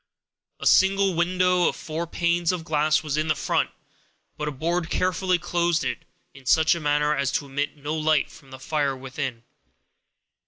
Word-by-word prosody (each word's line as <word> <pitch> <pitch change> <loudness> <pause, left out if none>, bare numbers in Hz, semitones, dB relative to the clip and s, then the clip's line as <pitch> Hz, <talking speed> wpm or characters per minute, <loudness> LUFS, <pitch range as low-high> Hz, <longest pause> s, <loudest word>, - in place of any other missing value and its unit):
A - - -6
single 195 0 +4
window 180 +1 +2
of - - -1
four 165 +2 -5
panes 170 0 +1
of 180 -3 -4
glass 155 0 +1
was 150 -1 -2
in 155 +1 0
front, - - 0 0.7
but 150 - -4
a - - -1
board 165 +4 -2
carefully 185 0 +1
closed 175 -1 0
it, - - -4 0.3
in 135 -2 -15
such 160 +3 +5
a 170 - -3
manner 150 0 +1
as 140 -1 0
to 145 - -1
emit 145 +2 -3
no 145 +2 -4
light 155 -2 +1
from 135 - -16
the 130 - -9
fire 140 0 -1
within. 130 -2 -5
155 Hz, 170 wpm, -25 LUFS, 145-175 Hz, 0.7 s, such